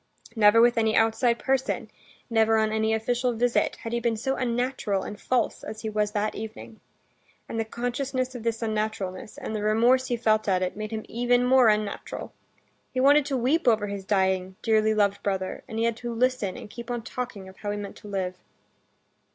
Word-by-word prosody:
Never 215 0 +6
with 240 0 +4
any 220 -1 +2
outside 225 +2 +3
person, 265 +1 -1 0.4
never 225 -1 +3
on 220 0 +2
any 220 0 +1
official 245 +3 0
visit 240 +1 +1
had 230 - -4
he 235 - +1
been 235 -1 0
so 265 +4 -1
unnatural 245 -5 -1
and 205 - -8
false 250 -3 0
as 215 0 -7
he 220 - -3
was 210 0 +1
that 215 0 0
evening. 220 0 -8 0.7
And 225 - -4
the 225 - 0
consciousness 255 +3 -2
of 245 - -7
this 230 0 -2
unnaturalness, 215 -2 -3
and 220 - -5
the 210 - -2
remorse 235 +5 +3
he 240 - -1
felt 215 -2 +2
at 185 -2 +2
it, 180 - -2
made 215 +1 -5
him 220 -1 -5
even 245 +1 +2
more 255 -1 +6
unnatural. 210 -1 -1 0.6
He 255 - -2
wanted 285 +2 +5
to 275 -2 0
weep 260 +6 +1
over 220 -3 +4
his 200 -1 -5
dying, 190 -1 +1
dearly 220 -1 +3
loved 200 -1 +2
brother, 190 -2 -2
and 220 - -6
he 225 - +1
had 230 -1 0
to 240 +1 -5
listen 235 -5 0
and - - -9
keep 235 +3 -9
on 240 -2 -3
talking 235 -6 -6
of 190 - -14
how 205 - -5
he 205 - -2
meant 205 -1 -7
to - - -12
live. 185 -2 -3
225 Hz, 200 wpm, -26 LUFS, 210-245 Hz, 0.7 s, Never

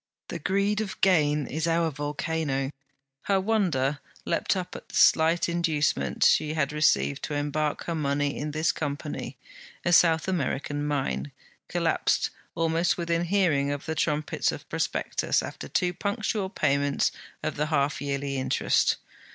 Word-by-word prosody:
The 170 - -4
greed 200 +5 +1
of 200 -3 -5
gain 150 -6 +3
is 160 +3 -2
our 165 -1 +2
volcano. 145 -1 -2 0.5
Her 195 -1 +3
wonder 175 -10 +1 0.3
leapt - - +1
up 180 -1 -5
at - - -10
the - - -9
slight 165 +2 +4
inducement 170 -3 0
she 155 +1 +4
had 150 -2 0
received 145 -2 +2
to 150 - -4
embark 145 +1 -1
her 170 - -3
money 145 -2 0
in 150 - -3
this 155 +2 +1
Company: 140 -3 -4 0.5
a 175 - +2
South 165 -1 +5
American 145 -4 -1
mine, 70 - -2 0.4
collapsed - - +1 0.2
almost 165 +1 +1
within 170 0 0
hearing 165 -7 +2
of 145 0 -4
the 160 - -2
trumpets 150 -1 0
of - - -8
prospectus, - - 0
after 70 - -7
two 180 - 0
punctual 200 0 -2
payments 140 -5 +1 0.3
of - - -2
the 150 +1 -1
half 145 -2 0
yearly 140 -1 -2
interest. 130 - +2
155 Hz, 145 wpm, -27 LUFS, 145-170 Hz, 0.5 s, South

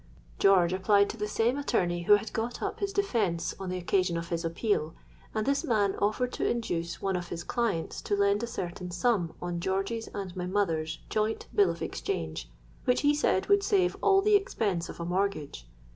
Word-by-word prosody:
George 185 -3 +5
applied 200 +2 +3
to - - -10
the 210 -2 -3
same 230 +5 +1
attorney 175 -11 0
who 210 - +7
had 205 +1 -4
got 230 +2 -2
up - - -3
his 400 -1 -1
defence 230 - 0
on 190 -1 -4
the 185 - -2
occasion 180 -1 +1
of 170 0 -5
his 170 -1 -2
appeal; 165 -1 -1 0.4
and 215 -1 0
this 280 0 +1
man 205 -4 +2
offered 230 +5 0
to - - -3
induce 170 -8 -2
one 195 -1 0
of 175 -1 -3
his 170 0 -5
clients 220 -9 -2
to 205 - 0
lend 200 +1 +2
a 235 - -2
certain 180 -4 -5
sum 175 -2 0
on 175 -1 -2
George's 195 +5 -2
and 195 -3 -6
my 180 -1 -3
mother's 165 -5 0
joint 215 +1 0
bill 200 -3 +5
of 170 -1 -4
exchange, 80 -7 -4 0.4
which 250 - +3
he 290 0 +4
said 290 -10 +1
would 405 0 +5
save 385 -3 +2
all 390 -1 +4
the 425 0 +5
expense 205 - 0
of - - -9
a 170 - -3
mortgage. 175 - -2
195 Hz, 200 wpm, -29 LUFS, 175-230 Hz, 0.4 s, who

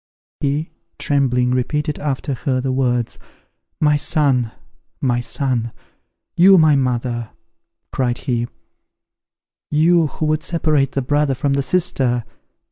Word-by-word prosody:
He, 145 +3 -1 0.3
trembling, 125 -3 +1
repeated 150 +4 -1
after 140 -1 -2
her 130 0 -1
the 130 +1 -1
words, 125 -3 0 0.6
"My 150 -1 +3
son! 135 -6 +1 0.5
my 125 -3 +1
son! 120 -1 -1 0.6
You 190 +2 +7
my 155 -3 +5
mother!" 120 -3 -1 0.6
cried 125 -2 -1
he; 120 -3 -2 1.2
"you, 165 +2 +3
who 155 - -4
would 155 0 +1
separate 155 -5 0
the 135 - -1
brother 145 +1 +1
from 140 +2 0
the 140 - +1
sister! 135 -7 +1
135 Hz, 120 wpm, -19 LUFS, 125-150 Hz, 1.2 s, You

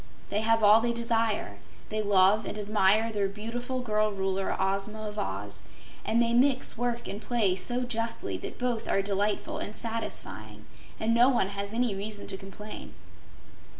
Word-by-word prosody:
They 205 - +1
have 225 0 +3
all 210 +2 +7
they 235 0 +1
desire; 225 - 0 0.3
they 215 0 -1
love 200 +1 +4
and 210 - -5
admire 210 +1 +2
their 205 -2 0
beautiful 240 +5 -4
girl 215 -2 +1
Ruler, 195 -1 -1
Ozma 200 +3 -1
of 210 0 -5
Oz, 100 +1 -4 0.4
and 225 - +1
they 235 0 +3
mix 260 +2 +3
work 240 0 -2
and 205 - -5
play 220 -7 +2
so 245 +6 0
justly 230 - -2
that - - -7
both 245 -2 -2
are 195 - +2
delightful 205 +1 -1
and 210 - -4
satisfying 230 -1 -3 0.3
and 225 +1 +1
no 240 +2 +6
one 240 -7 +2
has 200 0 -4
any 235 -1 +1
reason 205 +1 -4
to - - -2
complain. 195 +2 -9
215 Hz, 165 wpm, -28 LUFS, 200-230 Hz, 0.4 s, all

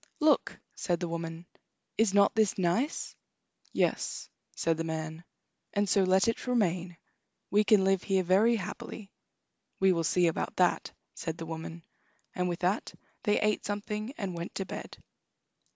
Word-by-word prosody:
"Look!" 310 -1 +3 0.2
said 175 -3 -1
the 175 - -2
woman, 165 0 -5 0.5
"is 220 -2 +3
not 200 0 +5
this 220 -3 +2
nice?" 195 - 0 0.6
"Yes," - - -1 0.3
said 165 -1 +1
the 165 - -1
man; 160 0 -4 0.5
"and 205 0 +1
so 195 +1 +4
let 190 +1 +4
it 230 +2 -1
remain. 180 -7 0 0.5
We 210 +1 +5
can 210 -2 +5
live 195 -1 +3
here 190 -2 +1
very 200 +7 +4
happily." 200 +1 -6 0.7
"We 190 0 +5
will 165 -2 +1
see 175 +2 +3
about 165 - -1
that," 180 -1 +2 0.2
said 165 -1 -4
the 165 - -6
woman, 165 +1 -7 0.5
and 180 0 0
with 175 - -3
that 185 +5 0 0.3
they 210 -1 +3
ate 210 0 +1
something 210 +2 -3
and 195 -5 -3
went 170 +1 -6
to 195 - -2
bed. - - -7
185 Hz, 155 wpm, -30 LUFS, 170-210 Hz, 0.7 s, not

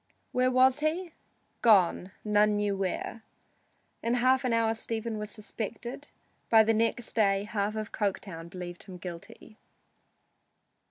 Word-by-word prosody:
Where 255 0 +2
was 255 +1 +4
he? 330 +4 -1 0.5
Gone, 190 -4 +4 0.2
none 210 0 +3
knew 205 -1 0
where! 195 +4 -3 0.8
In 235 +1 +1
an 255 +1 +3
hour 225 -1 +2
Stephen 225 0 -3
was 210 0 -5
suspected. 235 +5 -6 0.4
By 220 -1 +7
the 225 +1 +2
next 230 +1 0
day 200 -3 +3
half 210 0 -2
of 215 0 -4
Coketown 185 -5 -3
believed 175 -1 -7
him 185 -2 -10
guilty. 175 +5 -10
215 Hz, 125 wpm, -29 LUFS, 200-235 Hz, 0.8 s, By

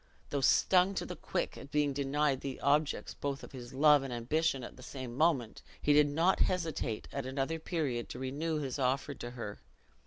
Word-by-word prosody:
Though 140 - 0
stung 185 +7 +4
to - - -2
the - - -6
quick - - -3
at - - -10
being 145 -1 +1
denied 140 0 +1
the 135 -1 -5
objects 145 +1 +1
both 140 -1 -4
of - - -10
his 125 -3 -9
love 145 +1 +6
and 135 -1 -5
ambition 135 +3 0
at - - -8
the - - -13
same 130 -2 -7
moment, 140 -6 +1 0.2
he 145 - +3
did 150 0 +6
not 165 +6 +2
hesitate 160 -11 -1
at 140 -2 -4
another 135 +5 -2
period 145 -8 -2
to - - -6
renew 145 +5 -2
his 140 -2 -3
offer 135 +2 0
to 120 - -7
her. 120 -4 -7
140 Hz, 195 wpm, -32 LUFS, 130-155 Hz, 0.2 s, love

